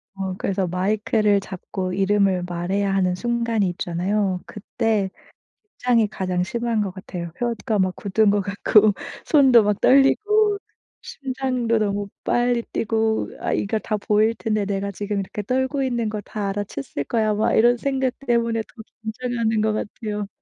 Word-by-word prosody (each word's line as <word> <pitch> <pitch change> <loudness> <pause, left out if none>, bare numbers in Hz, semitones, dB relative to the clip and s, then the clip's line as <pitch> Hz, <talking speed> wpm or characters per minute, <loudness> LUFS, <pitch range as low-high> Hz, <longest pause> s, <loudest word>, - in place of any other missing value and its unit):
어 190 -1 -3
그래서 195 -1 -1
마이크를 205 +3 +1
잡고 185 0 -5
이름을 195 -1 +2
말해야 190 +3 -1
하는 180 -2 +2
순간이 235 -2 0
있잖아요. 185 +2 -1
그때 215 -2 -1 0.7
긴장이 235 -3 +3
가장 185 -3 -1
심한 235 +1 -1
것 195 -3 -2
같아요. 180 -2 -7
혀가 230 -3 -1
막 185 -1 +1
굳은 210 +1 +2
것 205 0 +2
같고 205 +1 +4 0.3
손도 265 -7 +6
막 205 -1 0
떨리고 415 +10 +4 0.4
심장도 255 -4 -2
너무 205 -1 -1 0.2
빨리 240 -1 +1
뛰고 220 0 -1
'아 - - -1
이거 210 +2 0
다 215 - -2
보일 215 +2 +2
텐데. 215 -3 -1
내가 200 0 -2
지금 205 +1 -3
이렇게 195 +2 -5
떨고 260 +5 0
있는 240 -4 -1
거 215 - -4
다 205 0 -4
알아챘을 190 -8 -4
거야.' 220 -2 +1
막 210 +1 +1
이런 240 +2 +5
생각 265 0 0
때문에 235 -2 +1
더 220 - -14 0.2
긴장하는 225 -1 -1
것 215 0 +2
같아요. 210 -1 -4
215 Hz, 310 characters per minute, -22 LUFS, 195-235 Hz, 0.7 s, 손도